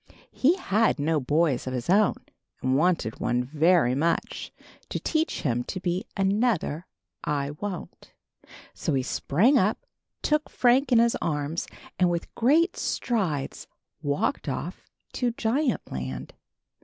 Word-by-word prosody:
He 305 +7 +3
had 225 - +1
no 155 +1 +1
boys 145 -1 +1
of 130 - -2
his 125 -1 -4
own, 200 +3 +4 0.4
and 130 0 +1
wanted 165 -7 +1
one 125 +1 +1
very 155 0 +3
much, 165 +5 -1 0.4
to - - -2
teach 315 0 -1
him 120 -3 0
to - - -4
be 180 +1 -2
another 195 -5 +1 0.4
I 145 -1 -1
Won't. 180 +4 -7 0.6
So - - -1
he 130 - +1
sprang 220 - +3
up, 215 - 0 0.4
took 300 0 +1
Frank 255 +2 +3
in 240 - +6
his 235 0 +4
arms, 150 +1 -2 0.3
and 180 -1 +4
with 170 -1 -3
great 305 +9 +3
strides 180 - -2 0.3
walked 145 - -1
off - - -5 0.3
to 245 -2 0
Giant 245 +4 0
Land. 65 0 -5
175 Hz, 135 wpm, -26 LUFS, 145-235 Hz, 0.6 s, in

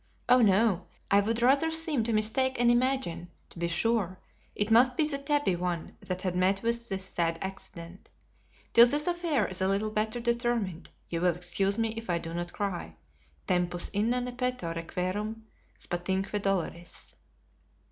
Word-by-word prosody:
Oh, 250 0 +6
no; 200 -3 +3 0.2
I 200 - +6
would 225 +3 -1
rather 275 +6 +4
seem 320 -6 0
to 230 - 0
mistake 230 +4 +1
and 240 0 +5
imagine, 240 -9 0 0.2
to - - -11
be 170 - 0
sure, 185 +1 +1 0.4
it 205 +2 -1
must 250 +3 +5
be 310 - +3
the 280 -2 0
tabby 285 -8 +1
one 175 -2 -3
that 185 0 -5
had 185 -2 -1
met 190 +3 +2
with 235 0 -1
this 190 -1 -3
sad 165 -3 -1
accident. 190 -2 -8 0.6
Till 235 +1 +9
this 290 +4 +1
affair 345 -5 +1
is 185 0 -5
a 190 - +2
little 200 +2 0
better 215 +2 -1
determined, 235 -7 -1 0.2
you 165 -1 -3
will 175 -2 +3
excuse 180 +3 0
me 225 -1 +1
if 225 -1 -7
I 175 - +2
do 165 0 -6
not 175 0 -3
cry, 180 - -4 0.5
'Tempus 175 -1 0
inane 245 +4 -1
peto, 250 -10 -2
requiem, 185 +6 -3 0.3
spatiumque 190 +3 -2
doloris.'" 175 -3 -3
205 Hz, 165 wpm, -29 LUFS, 180-240 Hz, 0.6 s, Till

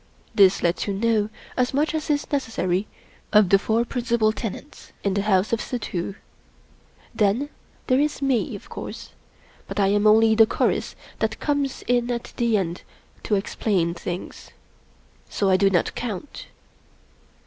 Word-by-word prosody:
This 195 -2 +5
lets 170 +4 0
you 200 - -1
know 215 0 +1 0.3
as 250 +1 0
much 300 +3 +1
as 315 0 -3
is 290 0 0
necessary 215 -8 -1 0.4
of 210 -3 +5
the 195 - +6
four 225 +3 +1
principal 235 -3 +1
tenants 225 +6 -7
in 200 - +1
the 200 - +1
house 195 +1 +2
of 230 - +1
Suddhoo. 195 -6 -4 1.0
Then 225 +7 +1 0.4
there 255 0 +3
is 295 +1 0
Me, 270 -4 0
of - - -11
course; - - -8 0.6
but - - -4
I 195 -1 +3
am 205 +1 +3
only 220 +1 +6
the 220 0 +6
chorus - - 0 0.2
that - - -1
comes 285 -2 -1
in 245 0 +1
at 240 -1 -4
the 235 -2 +2
end 180 -2 -3 0.4
to 210 - 0
explain 195 -3 0
things. 175 +1 -7 0.8
So 195 -2 +1
I - - +5
do 195 +1 +4
not 180 -3 +1
count. 235 +2 -6
215 Hz, 155 wpm, -24 LUFS, 195-245 Hz, 1.0 s, the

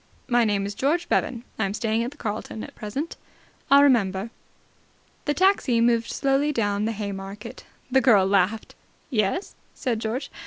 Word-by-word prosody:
"My 240 -2 +3
name 205 -2 0
is 200 - -4
George 305 +10 0
Bevan. 235 -2 0 0.2
I 220 - +2
am 195 +1 -3
staying 225 +1 0
at 240 - -2
the 290 - -16
Carlton 220 -1 -5
at - - -9
present." 270 +10 -5 0.5
"I'll 280 +1 +7
remember." 220 -6 +2 0.9
The 290 - 0
taxi 370 -11 +3
moved 235 0 +2
slowly 275 +2 +1
down 205 -5 0
the 225 - 0
Haymarket. 200 +2 -6 0.3
The 265 +1 +4
girl 210 -8 +5
laughed. 200 +2 +1 0.4
"Yes?" 215 - 0 0.2
said 240 -5 -1
George. 225 +5 -3
230 Hz, 160 wpm, -24 LUFS, 205-265 Hz, 0.9 s, I'll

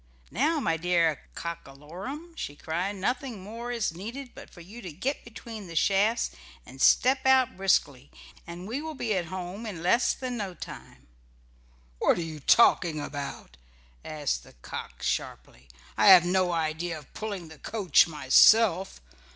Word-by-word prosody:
"Now, 305 +7 +1
my 165 - 0
dear 165 -2 +1
Cock 170 -3 -6
a 135 - -12
lorum," 250 - -8
she 145 - -6
cried, 175 +7 -3
"nothing 235 +1 -3
more 230 +4 -6
is 230 -8 -1
needed 240 +9 -7
but - - -12
for 175 - -14
you 210 +8 -11
to 180 -6 -7
get 265 - -3
between 225 -3 -9
the 165 - -9
shafts 205 +7 +2 0.3
and 130 +1 -11
step 265 +1 +4
out 265 -1 +4
briskly, 145 -8 +1 0.4
and 175 +2 -8
we 250 +6 -3
will 315 0 -6
be 230 -5 -1
at 180 -3 -1
home 185 +5 -6
in 175 -6 -6
less 235 +7 +3
than 255 -2 -4
no 195 -4 -4
time." - - -11 0.9
"What - - +3
are - - -2
you 160 -2 -7
talking 165 - +4
about?" 140 - -7 0.5
asked 145 - -2
the - - -17
cock - - -8
sharply. 65 +2 -4 0.3
"I - - +3
have 185 -3 +9
no 180 0 +1
idea 165 0 -2
of 150 -3 -15
pulling 200 -6 -6
the 160 -2 -14
coach 195 -5 +3
myself. 180 - +4
185 Hz, 165 wpm, -27 LUFS, 165-230 Hz, 0.9 s, have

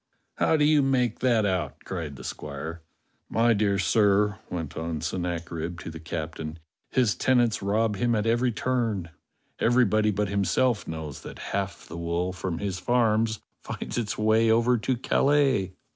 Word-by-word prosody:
"How 160 - +3
do 150 - +3
you 150 -1 +5
make 125 -4 +1
that 120 -4 +3
out?" 90 -8 -2
cried 80 -6 -5
the 65 - -10
squire. 75 +5 -6 0.5
"My 115 +1 +3
dear 100 -2 +1
sir," 105 +1 +3
went 80 -4 -5
on 80 -1 -3
Sennacherib 85 -1 -3
to 80 - -6
the 80 - -8
captain, 80 -1 -5 0.3
"his 125 -6 +2
tenants 120 +3 +2
rob 105 +1 +1
him 120 +2 +1
at 105 0 0
every 120 +2 +2
turn. 115 -7 -1 0.5
Everybody 110 -3 +3
but 105 0 0
himself 100 +4 +1
knows 80 -3 -6
that - - -9 0.2
half 100 -2 -3
the - - -8
wool 85 +2 -1
from 90 -2 -3
his 95 0 -3
farms 110 -1 +1 0.2
finds - - -4
its 110 -3 -3
way 110 +1 +3
over 115 +2 +4
to 125 +3 0
Calais." 135 -7 +2
105 Hz, 160 wpm, -26 LUFS, 85-115 Hz, 0.5 s, you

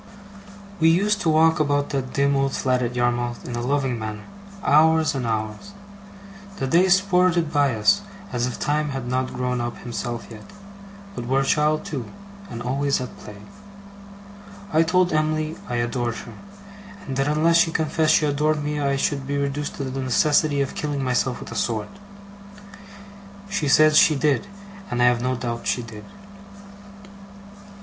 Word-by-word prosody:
We 160 - +5
used 205 +5 +2
to 170 - +1
walk 160 +1 +4
about 145 -1 0
that 135 -2 -3
dim 140 0 +2
old 135 0 0
flat 125 -1 0
at 120 0 -2
Yarmouth 120 -1 -1
in 120 - -4
a 120 - -3
loving 130 -1 -1
manner, 110 -1 -6 0.4
hours 160 +2 +4
and 130 -4 -3
hours. 110 - -4 0.8
The 135 - -2
days 175 +7 +4
sported 180 -4 +1
by 140 -4 +2
us, 155 - +3 0.3
as 120 0 0
if 125 - -6
Time 150 +1 0
had 135 -3 -5
not 130 +1 -1
grown 125 -1 -1
up 120 0 -4
himself 120 -1 -5
yet, 110 - -12 0.6
but 120 - -6
were 135 +2 +2
a - - -1
child 150 +5 +1
too, 145 - -4 0.4
and 115 - -6
always 140 +3 0
at 125 - -6
play. 100 -1 -11 1.3
I 160 - +5
told 180 +2 +2
Em'ly 155 0 0
I 120 - -2
adored 120 0 -1
her, - - -9 0.7
and 135 - -5
that 135 +1 0
unless 155 +3 +3
she 170 -1 +3
confessed 155 0 +2
she 155 - +3
adored 150 +1 0
me 150 0 -2
I 140 -1 +1
should 135 0 -1
be 140 0 -1
reduced 140 +1 -2
to 140 - -4
the 135 0 -4
necessity 145 +3 +2
of 135 - -2
killing 145 -2 -3
myself 125 0 0
with - - -9
a - - -7
sword. 110 -3 -2 1.6
She 180 -7 -1
said 155 +2 +5
she 155 0 +6
did, 145 +6 +1 0.4
and 120 - -2
I 125 - +4
have 120 -1 +3
no 130 +1 0
doubt 120 -1 -4
she 120 - 0
did. 110 -2 -10
140 Hz, 170 wpm, -23 LUFS, 125-155 Hz, 1.6 s, she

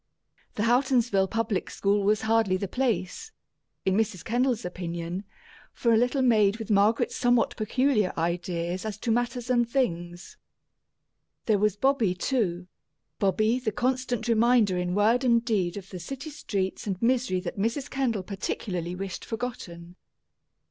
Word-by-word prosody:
The 210 - -1
Houghtonsville 240 -5 +2
public 225 -4 -1
school 200 0 +1
was 210 +2 +2
hardly 220 -4 +2
the 200 - -3
place, 250 - -2 0.5
in 190 -1 +2
Mrs. 205 -5 -1
Kendall's 245 0 0
opinion, 175 +1 -5 0.5
for 235 -1 +2
a - - +6
little 245 +4 +2
maid 215 -4 +4
with 225 -1 -5
Margaret's 205 +3 +3
somewhat 245 -1 +2
peculiar 225 -2 +1
ideas 170 +1 -2
as 215 -2 -4
to 225 - -2
matters 245 +1 -1
and 240 -2 +2
things. 175 -9 -2 1.1
There 215 -3 +2
was 210 -1 +2
Bobby, 230 -5 +2
too 185 -5 -1 0.5
Bobby, 215 +5 +2
the 240 -4 -2
constant 245 0 -1
reminder 230 -3 +3
in 180 0 -1
word 225 +5 +3
and 235 -2 +3
deed 200 -6 0
of 190 -1 -9
the 185 - -6
city 275 - -7
streets 200 -9 -3
and 190 -3 -2
misery 235 -5 +1
that 195 - -6
Mrs. 230 +7 -1
Kendall 245 -9 -1
particularly 180 -2 -4
wished 190 0 -5
forgotten. 180 -7 -6
215 Hz, 145 wpm, -27 LUFS, 185-245 Hz, 1.1 s, a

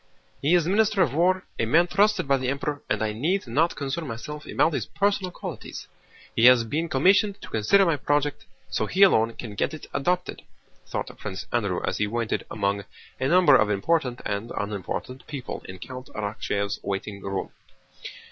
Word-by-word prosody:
"He 155 +6 +4
is 170 -3 +3
Minister 205 +1 +3
of 140 -7 -1
War, 180 +4 +2 0.2
a 115 - +1
man 165 +9 +5
trusted 200 -1 +2
by 140 0 +4
the 130 -1 -2
Emperor, 145 +1 -2
and - - 0
I 105 -1 -1
need 165 - 0
not 150 +8 +1
concern 140 +3 -3
myself 150 +6 -7
about 165 - +2
his - - -2
personal 200 -2 0
qualities: 175 - -8 0.5
he 115 - +4
has 125 -2 +8
been 155 +9 -2
commissioned 195 +8 +3
to - - -9
consider 150 - +4
my 165 -4 +2
project, 145 +1 0 0.2
so - - -1
he 195 +2 +4
alone 115 - +5
can 110 -4 -7
get 105 - -1
it 155 - -10
adopted," 180 +5 -1 0.5
thought - - -4
Prince - - -5
Andrew - - 0
as - - -2
he 105 - +1
waited 115 +1 -2
among 100 -1 -1 0.4
a 130 - +1
number 170 -3 +6
of 110 -4 +4
important 125 +4 0
and 100 +3 -3
unimportant 105 +5 -4
people 140 -4 -6
in 95 - -7
Count 130 +7 -9
Arakchéev's 100 -1 -2
waiting 100 +1 -4
room. 95 0 -4
135 Hz, 180 wpm, -25 LUFS, 110-175 Hz, 0.5 s, has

